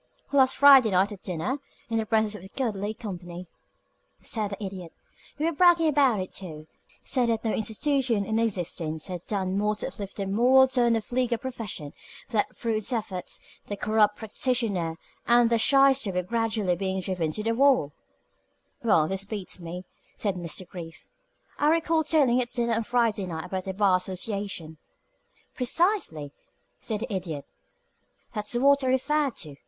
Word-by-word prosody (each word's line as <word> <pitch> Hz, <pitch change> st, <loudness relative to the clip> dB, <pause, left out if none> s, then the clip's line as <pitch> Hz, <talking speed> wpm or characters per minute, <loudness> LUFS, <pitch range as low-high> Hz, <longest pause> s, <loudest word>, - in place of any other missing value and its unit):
"Last 265 Hz, -2 st, +4 dB
Friday 270 Hz, -4 st, +8 dB
night 190 Hz, +2 st, +2 dB
at 200 Hz, -2 st, -9 dB
dinner, 175 Hz, +4 st, -3 dB, 0.4 s
and -, -, -24 dB
in 225 Hz, -, +1 dB
the 220 Hz, -, -3 dB
presence 220 Hz, -1 st, +1 dB
of 210 Hz, -, -8 dB
this 190 Hz, -, -11 dB
goodly 215 Hz, -5 st, -2 dB
company," 180 Hz, -5 st, -7 dB, 0.7 s
said 215 Hz, -3 st, -1 dB
the 200 Hz, +1 st, -6 dB
Idiot. 185 Hz, -3 st, -7 dB, 0.5 s
"You 300 Hz, -, -1 dB
were 335 Hz, -, +2 dB
bragging 335 Hz, 0 st, +4 dB
about 270 Hz, -7 st, +3 dB
it, 185 Hz, -, -5 dB
too 155 Hz, -5 st, -8 dB, 0.4 s
said 245 Hz, -2 st, +2 dB
that 225 Hz, 0 st, -1 dB
no 220 Hz, -, +1 dB
institution 230 Hz, 0 st, 0 dB
in 220 Hz, +2 st, 0 dB
existence 175 Hz, -7 st, -2 dB
had 180 Hz, -3 st, -6 dB
done 195 Hz, -2 st, -1 dB
more 210 Hz, +1 st, +1 dB
to -, -, -3 dB
uplift 200 Hz, -2 st, -8 dB
the 200 Hz, -, -2 dB
moral 250 Hz, +7 st, +5 dB
tone 245 Hz, -3 st, +2 dB
of 225 Hz, -, -3 dB
the -, -, -10 dB
legal 245 Hz, -2 st, +1 dB
profession; 225 Hz, -, -6 dB, 0.4 s
that 220 Hz, -4 st, -1 dB
through 230 Hz, -2 st, -1 dB
its 215 Hz, -, -2 dB
efforts 195 Hz, -6 st, -4 dB, 0.3 s
the 205 Hz, -, -4 dB
corrupt 215 Hz, 0 st, +2 dB
practitioner 215 Hz, -7 st, -1 dB, 0.3 s
and 240 Hz, 0 st, +5 dB
the 230 Hz, -, +3 dB
shyster 270 Hz, -3 st, +4 dB
were 180 Hz, 0 st, -1 dB
gradually 215 Hz, -2 st, 0 dB
being 190 Hz, +1 st, -2 dB
driven 175 Hz, -4 st, -2 dB
to 215 Hz, -, -3 dB
the 225 Hz, +1 st, +1 dB
wall 255 Hz, -, +3 dB, 0.4 s
" -, -, -40 dB
"Well, 165 Hz, -9 st, +4 dB
this 195 Hz, +2 st, -2 dB
beats 200 Hz, -2 st, -6 dB
me," 175 Hz, +1 st, -7 dB, 0.3 s
said 200 Hz, -2 st, -1 dB
Mr. 175 Hz, 0 st, -5 dB
Brief. 165 Hz, -3 st, -10 dB, 0.5 s
"I 295 Hz, -, +3 dB
recall 325 Hz, 0 st, +2 dB
telling 275 Hz, -5 st, +3 dB
at 240 Hz, -, -4 dB
dinner 235 Hz, -1 st, 0 dB
on 225 Hz, 0 st, -1 dB
Friday 225 Hz, -5 st, +1 dB
night 160 Hz, -2 st, -5 dB
about 185 Hz, -1 st, -4 dB
the 190 Hz, -, -3 dB
Bar 195 Hz, -2 st, +4 dB
Association 185 Hz, -3 st, -4 dB, 0.4 s
" -, -, -38 dB
"Precisely," 255 Hz, -, +1 dB, 0.5 s
said 215 Hz, -1 st, -3 dB
the 235 Hz, -2 st, -4 dB
Idiot. 165 Hz, -7 st, -4 dB, 0.9 s
"That's 210 Hz, +2 st, -3 dB
what 280 Hz, +3 st, +4 dB
I -, -, 0 dB
referred 275 Hz, +2 st, +1 dB
to. 150 Hz, -4 st, -9 dB
215 Hz, 175 wpm, -26 LUFS, 185-245 Hz, 0.9 s, Friday